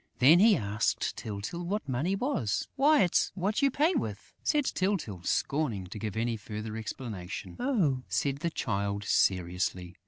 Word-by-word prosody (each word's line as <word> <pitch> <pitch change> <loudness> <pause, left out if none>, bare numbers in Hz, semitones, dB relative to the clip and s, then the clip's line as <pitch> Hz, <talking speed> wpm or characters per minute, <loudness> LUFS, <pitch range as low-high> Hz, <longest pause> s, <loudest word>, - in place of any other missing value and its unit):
Then 150 +8 +7
he 210 -1 +6
asked 105 -2 -1
Tyltyl 105 +11 -5
what 200 +2 -2
money 145 +9 0
was. 195 - -1
"Why, 290 +2 +5
it's 175 - +2
what 200 +3 0
you 280 - +5
pay 305 +7 +2
with!" 105 - -4
said 295 -3 +1
Tyltyl, 185 - -1
scorning 125 - 0
to 95 +4 -8
give 110 -1 -4
any 115 0 0
further 105 +1 -6
explanation. 110 -4 -6
"Oh!" 195 - +1
said 140 -1 0
the 170 +4 -1
Child, 100 -8 -2
seriously. 90 -2 0
125 Hz, 155 wpm, -29 LUFS, -, -, Then